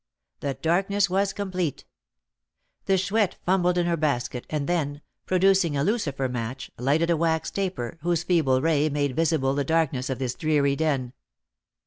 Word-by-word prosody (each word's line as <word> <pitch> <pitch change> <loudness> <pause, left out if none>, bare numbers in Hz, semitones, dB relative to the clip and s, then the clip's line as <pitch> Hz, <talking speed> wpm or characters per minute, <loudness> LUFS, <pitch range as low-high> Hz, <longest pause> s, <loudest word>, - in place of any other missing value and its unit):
The 140 -2 -3
darkness 195 +3 +1
was 195 +1 +1
complete. 185 -7 -3 1.0
The 195 - +3
Chouette 200 +1 +1
fumbled 180 -1 +2
in 175 - +2
her 170 -1 +1
basket, 130 -5 -2
and 150 -2 -2
then, 150 -4 -1 0.3
producing 185 -4 +3
a 140 - +1
lucifer 150 - 0
match, 125 0 -5
lighted 150 +7 +2
a - - +4
wax 160 0 0
taper, 180 -8 -3
whose 170 0 0
feeble 150 -7 +2
ray 155 -2 +2
made 145 -2 -1
visible 155 -5 +1
the 140 0 0
darkness 140 -4 0
of 130 - -2
this 130 -2 -2
dreary 145 -3 +1
den. 140 -5 -1
160 Hz, 155 wpm, -25 LUFS, 140-180 Hz, 1.0 s, a